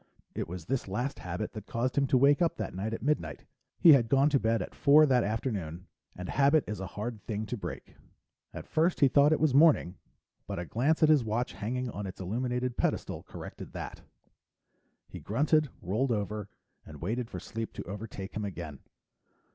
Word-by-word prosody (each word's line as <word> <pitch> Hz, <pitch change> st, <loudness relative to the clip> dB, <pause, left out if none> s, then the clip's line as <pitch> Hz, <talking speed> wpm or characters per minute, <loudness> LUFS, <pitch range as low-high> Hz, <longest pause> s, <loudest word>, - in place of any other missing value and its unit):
It -, -, -3 dB
was 85 Hz, -1 st, -7 dB
this 130 Hz, +1 st, -2 dB
last 125 Hz, +8 st, -3 dB
habit 90 Hz, +4 st, -4 dB
that 110 Hz, -2 st, -8 dB
caused 125 Hz, +2 st, -1 dB
him 140 Hz, -1 st, +2 dB
to 130 Hz, -, +3 dB
wake 140 Hz, +5 st, +4 dB
up 170 Hz, -, +2 dB
that -, -, -4 dB
night 100 Hz, +4 st, -3 dB
at 115 Hz, -, -5 dB
midnight; 105 Hz, -, -1 dB, 0.3 s
he 165 Hz, -, +9 dB
had 120 Hz, -5 st, +4 dB
gone 140 Hz, +2 st, +4 dB
to 140 Hz, -, +4 dB
bed 115 Hz, 0 st, +1 dB
at -, -, -10 dB
four 150 Hz, +2 st, +6 dB
that 125 Hz, -4 st, +3 dB
afternoon 100 Hz, -6 st, -3 dB, 0.3 s
and 90 Hz, 0 st, -6 dB
habit 140 Hz, -, +3 dB
is 105 Hz, -2 st, -5 dB
a 95 Hz, -, -4 dB
hard 110 Hz, 0 st, -4 dB
thing 110 Hz, -1 st, -2 dB
to 125 Hz, -, -4 dB
break. 110 Hz, -, -7 dB, 0.6 s
At -, -, -8 dB
first 165 Hz, +2 st, +1 dB
he 140 Hz, -, +8 dB
thought 140 Hz, +3 st, +5 dB
it 155 Hz, -, +3 dB
was 155 Hz, -4 st, +2 dB
morning, 140 Hz, -, +4 dB, 0.5 s
but -, -, -4 dB
a 85 Hz, -, -3 dB
glance 140 Hz, -, +1 dB
at 155 Hz, -, +6 dB
his 150 Hz, -5 st, +5 dB
watch 115 Hz, +3 st, -2 dB
hanging 125 Hz, +4 st, -3 dB
on 100 Hz, -1 st, -5 dB
its 95 Hz, -, -9 dB
illuminated 125 Hz, +5 st, -2 dB
pedestal -, -, -1 dB
corrected -, -, -10 dB
that. -, -, -7 dB, 1.1 s
He -, -, -9 dB
grunted, 150 Hz, +6 st, +2 dB
rolled 110 Hz, +9 st, 0 dB
over, 105 Hz, -1 st, -2 dB, 0.3 s
and 75 Hz, -2 st, -11 dB
waited 115 Hz, +7 st, -2 dB
for -, -, -6 dB
sleep 115 Hz, 0 st, -5 dB
to -, -, -6 dB
overtake 100 Hz, 0 st, -7 dB
him 110 Hz, -, -2 dB
again. 85 Hz, -8 st, -6 dB
115 Hz, 195 wpm, -30 LUFS, 100-140 Hz, 1.1 s, he